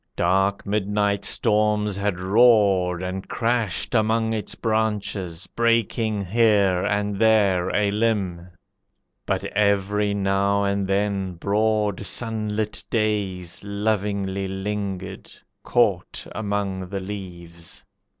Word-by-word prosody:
Dark 95 Hz, +3 st, +1 dB
midnight 105 Hz, 0 st, 0 dB
storms 105 Hz, -2 st, +1 dB
had 100 Hz, -2 st, -1 dB
roared 95 Hz, -3 st, +4 dB
and 95 Hz, +1 st, -4 dB
crashed 115 Hz, -5 st, -1 dB
among 110 Hz, 0 st, +2 dB
Its 105 Hz, -2 st, -4 dB
branches, 105 Hz, -6 st, -2 dB
breaking 115 Hz, -3 st, 0 dB
here 100 Hz, -3 st, +3 dB
and 105 Hz, -1 st, -1 dB
there 105 Hz, -5 st, +3 dB
a 105 Hz, -1 st, +2 dB
limb; 100 Hz, -5 st, -1 dB, 0.8 s
But -, -, 0 dB
every 100 Hz, 0 st, +1 dB
now 100 Hz, 0 st, +1 dB
and 100 Hz, -1 st, 0 dB
then 95 Hz, -2 st, -1 dB
broad 105 Hz, +2 st, 0 dB
sunlit 110 Hz, -1 st, -3 dB
days 100 Hz, -6 st, -1 dB
Lovingly 100 Hz, -2 st, -1 dB
lingered, 95 Hz, -1 st, -5 dB, 0.3 s
caught -, -, 0 dB
among 100 Hz, -3 st, -3 dB
the 100 Hz, -, -3 dB
leaves. 90 Hz, -4 st, -8 dB
100 Hz, 100 wpm, -23 LUFS, 95-105 Hz, 0.8 s, roared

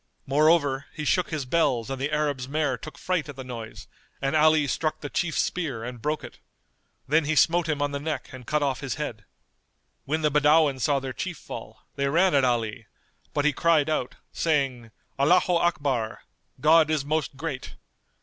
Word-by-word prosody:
Moreover 145 Hz, -1 st, +3 dB
he 150 Hz, -, -4 dB
shook 180 Hz, +4 st, +1 dB
his 155 Hz, -4 st, -3 dB
bells 130 Hz, -4 st, +1 dB
and 135 Hz, -1 st, -4 dB
the 145 Hz, +2 st, -1 dB
Arab's 145 Hz, -4 st, -1 dB
mare 150 Hz, -2 st, 0 dB
took 155 Hz, +5 st, -10 dB
fright 180 Hz, -5 st, -1 dB
at 145 Hz, -, -7 dB
the 130 Hz, -, -7 dB
noise 115 Hz, -3 st, -8 dB, 0.3 s
and 135 Hz, +2 st, -1 dB
Ali 155 Hz, -1 st, +5 dB
struck 155 Hz, +2 st, -1 dB
the 145 Hz, -, -6 dB
Chief's 165 Hz, -3 st, -1 dB
spear 140 Hz, -11 st, -3 dB
and 125 Hz, -1 st, -7 dB
broke 150 Hz, +4 st, -2 dB
it. -, -, -11 dB, 0.7 s
Then 155 Hz, +2 st, +3 dB
he 155 Hz, +2 st, 0 dB
smote 165 Hz, +3 st, +3 dB
him 145 Hz, -2 st, 0 dB
on 145 Hz, -, -1 dB
the 140 Hz, -, -3 dB
neck 155 Hz, -1 st, -4 dB
and 125 Hz, -2 st, -10 dB
cut 150 Hz, -1 st, +1 dB
off 135 Hz, -2 st, 0 dB
his 135 Hz, -2 st, -3 dB
head.[FN#221] 115 Hz, -8 st, -5 dB, 0.8 s
When 155 Hz, +3 st, -1 dB
the 150 Hz, -, +3 dB
Badawin 150 Hz, -1 st, +4 dB
saw 140 Hz, +2 st, +2 dB
their 130 Hz, -1 st, -5 dB
chief 110 Hz, -, -4 dB
fall, -, -, -9 dB, 0.2 s
they 140 Hz, 0 st, +1 dB
ran 175 Hz, +5 st, +3 dB
at 140 Hz, -2 st, +4 dB
Ali, 115 Hz, -2 st, -1 dB, 0.4 s
but 145 Hz, -1 st, 0 dB
he 150 Hz, -, +3 dB
cried 155 Hz, -1 st, +2 dB
out, 130 Hz, -5 st, -2 dB, 0.2 s
saying, 135 Hz, -7 st, 0 dB, 0.3 s
"Allaho 175 Hz, +4 st, +4 dB
Akbar—God 150 Hz, +1 st, +1 dB
is 155 Hz, -3 st, 0 dB
Most 150 Hz, -2 st, -1 dB
Great!" 140 Hz, -3 st, -5 dB
145 Hz, 185 wpm, -26 LUFS, 130-155 Hz, 0.8 s, Ali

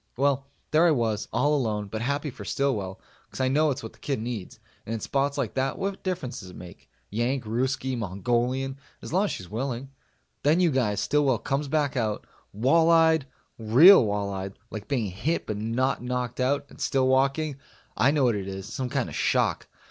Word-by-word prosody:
Well, 140 Hz, 0 st, +1 dB, 0.2 s
there 160 Hz, +3 st, +5 dB
I -, -, +5 dB
was, 115 Hz, -8 st, 0 dB
all 150 Hz, +1 st, +2 dB
alone, 110 Hz, -6 st, -1 dB
but 110 Hz, +2 st, -5 dB
happy 140 Hz, +3 st, -1 dB
for 130 Hz, -, -10 dB
Stillwell, 105 Hz, -10 st, -1 dB, 0.3 s
cause -, -, -10 dB
I 130 Hz, 0 st, +2 dB
know 150 Hz, +3 st, +3 dB
it's 140 Hz, 0 st, -3 dB
what -, -, -7 dB
the -, -, -23 dB
kid 140 Hz, -4 st, -2 dB
needs, 110 Hz, -4 st, -5 dB, 0.2 s
and 115 Hz, -, -4 dB
in -, -, -4 dB
spots 140 Hz, +4 st, -1 dB
like 130 Hz, -7 st, -2 dB
that 135 Hz, 0 st, -1 dB
what 195 Hz, 0 st, -3 dB
difference 175 Hz, -10 st, -3 dB
does 95 Hz, -3 st, -10 dB
it 90 Hz, -, -12 dB
make? 90 Hz, -1 st, -12 dB, 0.2 s
Yank 120 Hz, +4 st, -1 dB
Ruskie 130 Hz, +3 st, -1 dB
Mongolian 120 Hz, +6 st, -1 dB, 0.2 s
as -, -, -7 dB
long 190 Hz, +3 st, +3 dB
as -, -, -2 dB
she's 90 Hz, -, -6 dB
willing. 125 Hz, +5 st, -4 dB, 0.5 s
Then, 155 Hz, +4 st, +3 dB
you 175 Hz, -3 st, +3 dB
guys, 105 Hz, -6 st, +1 dB
Stillwell 140 Hz, -4 st, +2 dB
comes 140 Hz, +6 st, -2 dB
back 145 Hz, -1 st, 0 dB
out 110 Hz, -4 st, -1 dB, 0.3 s
wall 135 Hz, +10 st, +3 dB
eyed 160 Hz, -3 st, +4 dB, 0.3 s
real 130 Hz, -, +8 dB
wall 100 Hz, -2 st, -1 dB
eyed 95 Hz, 0 st, -5 dB
like 105 Hz, -1 st, -7 dB
being 130 Hz, -6 st, 0 dB
hit 125 Hz, -, -1 dB
but 105 Hz, -, -3 dB
not 115 Hz, +5 st, 0 dB
knocked 125 Hz, 0 st, -3 dB
out 140 Hz, +3 st, +1 dB
and -, -, -13 dB
still 130 Hz, -1 st, +2 dB
walking. 140 Hz, +3 st, +1 dB, 0.4 s
I 130 Hz, -, +4 dB
know 145 Hz, -1 st, +2 dB
what 120 Hz, -2 st, +4 dB
it 100 Hz, -2 st, -4 dB
is 95 Hz, 0 st, -6 dB
some 130 Hz, -1 st, -3 dB
kind -, -, -1 dB
of -, -, -8 dB
shock. -, -, +1 dB
130 Hz, 200 wpm, -26 LUFS, 110-140 Hz, 0.5 s, real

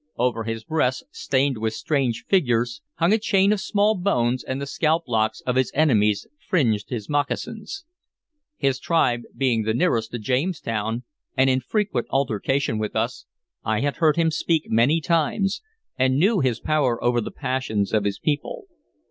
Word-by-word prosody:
Over 115 Hz, -2 st, 0 dB
his 115 Hz, 0 st, -4 dB
breast, 130 Hz, -4 st, 0 dB
stained 135 Hz, -3 st, 0 dB
with 110 Hz, 0 st, -2 dB
strange 130 Hz, -5 st, -1 dB
figures, 120 Hz, -, +1 dB
hung 170 Hz, +4 st, +2 dB
a 220 Hz, -, +3 dB
chain 200 Hz, -1 st, +3 dB
of 210 Hz, -, -2 dB
small 210 Hz, +2 st, +2 dB
bones, 130 Hz, -, 0 dB
and 130 Hz, +1 st, -4 dB
the 140 Hz, -, -3 dB
scalp 160 Hz, +4 st, +1 dB
locks 110 Hz, -2 st, 0 dB
of 125 Hz, -, -2 dB
his 130 Hz, -, +1 dB
enemies 105 Hz, -9 st, +3 dB
fringed 115 Hz, -, 0 dB
his 110 Hz, -5 st, -4 dB
moccasins. 210 Hz, -, -3 dB, 0.7 s
His 135 Hz, -1 st, 0 dB
tribe 125 Hz, -8 st, +1 dB, 0.2 s
being 125 Hz, -4 st, +2 dB
the 110 Hz, +1 st, -1 dB
nearest 120 Hz, -6 st, +1 dB
to 120 Hz, -, -4 dB
Jamestown, 120 Hz, -, -2 dB, 0.3 s
and 130 Hz, 0 st, +4 dB
in 130 Hz, -, +2 dB
frequent 135 Hz, -, -1 dB
altercation 135 Hz, -1 st, 0 dB
with 105 Hz, -1 st, -3 dB
us, -, -, -2 dB, 0.4 s
I 110 Hz, 0 st, 0 dB
had 140 Hz, 0 st, -1 dB
heard 155 Hz, -3 st, +3 dB
him 165 Hz, -1 st, +2 dB
speak 165 Hz, 0 st, 0 dB
many 125 Hz, +9 st, +3 dB
times, 170 Hz, +5 st, 0 dB, 0.4 s
and 130 Hz, 0 st, +3 dB
knew 195 Hz, +6 st, +3 dB
his 125 Hz, -5 st, 0 dB
power 145 Hz, -6 st, +1 dB
over 120 Hz, 0 st, +2 dB
the -, -, -5 dB
passions 130 Hz, -7 st, -2 dB
of 110 Hz, -2 st, +2 dB
his 100 Hz, -1 st, -1 dB
people. 150 Hz, -, -2 dB
130 Hz, 165 wpm, -23 LUFS, 115-160 Hz, 0.7 s, and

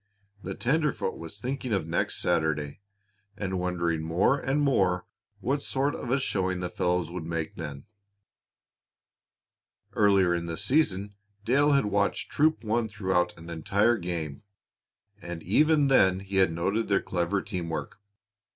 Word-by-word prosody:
The 95 Hz, 0 st, -5 dB
tenderfoot 150 Hz, -5 st, 0 dB
was 85 Hz, +4 st, -8 dB
thinking 130 Hz, +2 st, -4 dB
of 95 Hz, -6 st, 0 dB
next 80 Hz, -, -1 dB
Saturday, 75 Hz, -1 st, 0 dB, 0.6 s
and 95 Hz, -3 st, -2 dB
wondering 85 Hz, -3 st, -1 dB
more 85 Hz, -, +2 dB
and 135 Hz, +2 st, 0 dB
more 95 Hz, -11 st, +2 dB, 0.4 s
what 140 Hz, +2 st, 0 dB
sort 140 Hz, +1 st, 0 dB
of -, -, -6 dB
a 135 Hz, +3 st, +2 dB
showing 95 Hz, -7 st, -1 dB
the 90 Hz, -1 st, -4 dB
fellows 90 Hz, -2 st, 0 dB
would 85 Hz, -3 st, -5 dB
make 80 Hz, -1 st, -3 dB
then. 70 Hz, +1 st, -7 dB, 2.1 s
Earlier 100 Hz, -4 st, +4 dB
in 85 Hz, 0 st, -2 dB
the 85 Hz, -, -4 dB
season, 105 Hz, -4 st, +1 dB, 0.3 s
Dale 145 Hz, +5 st, +4 dB
had 140 Hz, -4 st, +3 dB
watched 100 Hz, 0 st, 0 dB
Troop 155 Hz, -1 st, +2 dB
One 110 Hz, +1 st, 0 dB
throughout 95 Hz, -4 st, 0 dB
an 85 Hz, 0 st, -10 dB
entire 100 Hz, +8 st, +2 dB
game, 85 Hz, -5 st, -4 dB, 0.8 s
and 85 Hz, -1 st, -7 dB
even 150 Hz, -, +4 dB
then 95 Hz, -8 st, +4 dB
he 100 Hz, 0 st, -4 dB
had 95 Hz, -3 st, +4 dB
noted 95 Hz, +7 st, -1 dB
their 100 Hz, -, +2 dB
clever 90 Hz, +2 st, 0 dB
team 85 Hz, -2 st, -4 dB
work. 80 Hz, -, -5 dB
95 Hz, 145 wpm, -27 LUFS, 85-120 Hz, 2.1 s, Earlier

